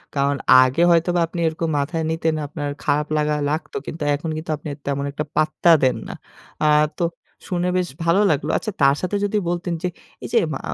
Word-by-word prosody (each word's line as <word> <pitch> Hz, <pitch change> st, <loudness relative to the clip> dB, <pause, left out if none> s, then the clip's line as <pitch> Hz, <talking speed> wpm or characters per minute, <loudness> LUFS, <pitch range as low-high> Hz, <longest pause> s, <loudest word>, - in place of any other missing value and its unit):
কারণ 140 Hz, 0 st, +1 dB, 0.3 s
আগে 130 Hz, +6 st, 0 dB
হয়তোবা 170 Hz, +1 st, +2 dB
আপনি 170 Hz, +1 st, -6 dB
এরকম 160 Hz, +1 st, -2 dB
মাথায় 155 Hz, +3 st, -2 dB
নিতেন, 160 Hz, 0 st, 0 dB
আপনার 145 Hz, 0 st, -4 dB
খারাপ 150 Hz, 0 st, +1 dB
লাগা 150 Hz, 0 st, +1 dB
লাগত। 155 Hz, +3 st, -3 dB
কিন্তু 160 Hz, -1 st, -6 dB
এখন 150 Hz, +3 st, -3 dB
কিন্তু 155 Hz, 0 st, -5 dB
আপনি 145 Hz, -, -10 dB, 0.2 s
তেমন 140 Hz, 0 st, -1 dB
একটা 145 Hz, +2 st, -3 dB
পাত্তা 155 Hz, +2 st, +3 dB
দেন 130 Hz, -, +3 dB
না। -, -, -6 dB, 0.5 s
আ -, -, +5 dB, 0.3 s
তো -, -, -1 dB, 0.4 s
শুনে 180 Hz, -1 st, -1 dB
বেশ 180 Hz, -1 st, 0 dB, 0.2 s
ভালো 170 Hz, +3 st, +3 dB
লাগলো। 145 Hz, -2 st, -1 dB
আচ্ছা, 215 Hz, -, -4 dB
তার 140 Hz, 0 st, +5 dB
সাথে 185 Hz, +2 st, -2 dB
যদি 205 Hz, +1 st, 0 dB
বলতেন 175 Hz, 0 st, -2 dB
যে, -, -, +1 dB, 0.4 s
এই -, -, -4 dB
যে -, -, +4 dB, 0.2 s
মা -, -, -4 dB
160 Hz, 195 wpm, -21 LUFS, 145-170 Hz, 0.5 s, আ